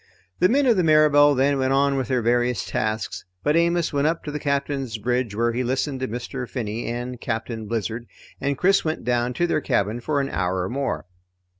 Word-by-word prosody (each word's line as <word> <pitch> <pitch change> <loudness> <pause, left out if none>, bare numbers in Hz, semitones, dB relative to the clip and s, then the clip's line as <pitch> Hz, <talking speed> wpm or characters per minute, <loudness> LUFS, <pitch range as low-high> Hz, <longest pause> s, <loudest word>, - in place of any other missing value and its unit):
The 180 - +4
men 280 +3 +3
of 235 -5 +4
the 180 - +3
Mirabelle 150 -2 +5
then 135 +1 +2
went 130 0 +1
on 140 0 +3
with 130 -2 -1
their 125 -3 0
various 120 +1 +1
tasks, 110 0 -2 0.2
but 150 - +2
Amos 170 -1 +2
went 140 +1 +2
up 165 +1 -1
to 150 - -5
the 150 - -4
Captain's 140 -4 -2
bridge 120 0 -1
where 115 +1 +1
he 125 +2 -1
listened 130 +2 -1
to 130 - -2
Mr. 125 +2 -5
Finney 115 -2 -4
and 120 +1 -4
Captain 115 -1 -4
Blizzard, 115 +1 -3 0.3
and 140 0 -1
Chris 195 +2 +3
went 155 0 -2
down 120 0 0
to 175 - +1
their 165 - 0
cabin 115 -4 0
for 145 +4 -1
an 135 0 -1
hour 90 0 -1
or 90 - -3
more. 135 0 -2
130 Hz, 210 wpm, -23 LUFS, 120-145 Hz, 0.3 s, Mirabelle